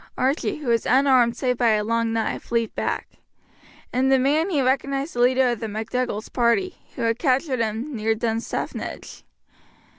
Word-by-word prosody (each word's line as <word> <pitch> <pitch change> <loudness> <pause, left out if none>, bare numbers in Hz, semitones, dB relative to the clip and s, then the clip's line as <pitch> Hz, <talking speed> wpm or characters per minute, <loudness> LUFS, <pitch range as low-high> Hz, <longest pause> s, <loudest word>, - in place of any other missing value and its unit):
Archie, 270 +5 0
who 300 -4 -8
was 230 -1 +1
unarmed 255 -3 +4
save 250 -2 0
by 235 -3 +4
a 210 0 +1
long 230 +1 0
knife, 225 +1 -3
leapt 230 -1 0
back. - - -2 0.9
In 260 +2 +2
the 270 - +5
man 295 +7 +2
he 315 -7 +1
recognized 275 +3 0
the 240 - -5
leader 255 +1 +4
of 235 - -3
the 225 - -4
MacDougall's 220 +1 -3
party, 250 +11 +1 0.2
who 240 - -4
had 230 +1 0
captured 265 -2 +1
him 230 +5 -2
near 220 0 0
Dunstaffnage. 225 +1 -4
245 Hz, 170 wpm, -23 LUFS, 230-270 Hz, 0.9 s, the